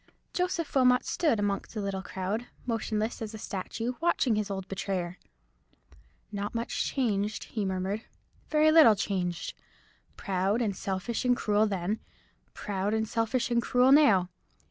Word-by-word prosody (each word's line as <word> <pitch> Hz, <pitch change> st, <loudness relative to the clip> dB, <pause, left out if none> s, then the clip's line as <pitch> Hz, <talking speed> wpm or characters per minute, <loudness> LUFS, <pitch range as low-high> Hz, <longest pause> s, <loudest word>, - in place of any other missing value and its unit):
Joseph 360 Hz, -3 st, -1 dB
Wilmot 250 Hz, -2 st, +4 dB
stood 305 Hz, -11 st, +1 dB
among 200 Hz, -1 st, 0 dB
the 220 Hz, -, -5 dB
little 195 Hz, -1 st, -2 dB
crowd, 195 Hz, +5 st, -3 dB, 0.2 s
motionless 225 Hz, -1 st, -2 dB
as 220 Hz, 0 st, -5 dB
a -, -, -6 dB
statue, 225 Hz, +4 st, -4 dB
watching 335 Hz, -8 st, +2 dB
his 210 Hz, -1 st, -1 dB
old 190 Hz, -1 st, -4 dB
betrayer. 185 Hz, -2 st, -3 dB, 1.1 s
"Not 205 Hz, +2 st, -4 dB
much 230 Hz, +1 st, -1 dB
changed," 210 Hz, -6 st, -1 dB
he 215 Hz, -3 st, -3 dB
murmured; 190 Hz, +3 st, -2 dB, 0.4 s
"very 310 Hz, 0 st, +4 dB
little 310 Hz, -9 st, +8 dB
changed! 180 Hz, -4 st, -2 dB, 0.6 s
Proud, 195 Hz, +2 st, 0 dB
and 210 Hz, -5 st, 0 dB
selfish, 195 Hz, +4 st, -3 dB
and 250 Hz, -1 st, +3 dB
cruel 210 Hz, +1 st, +2 dB
then—proud, 200 Hz, +1 st, -4 dB
and 220 Hz, 0 st, 0 dB
selfish, 230 Hz, +3 st, 0 dB
and 235 Hz, 0 st, +3 dB
cruel 250 Hz, +2 st, +3 dB
now. 210 Hz, -12 st, +5 dB
215 Hz, 140 wpm, -29 LUFS, 195-240 Hz, 1.1 s, little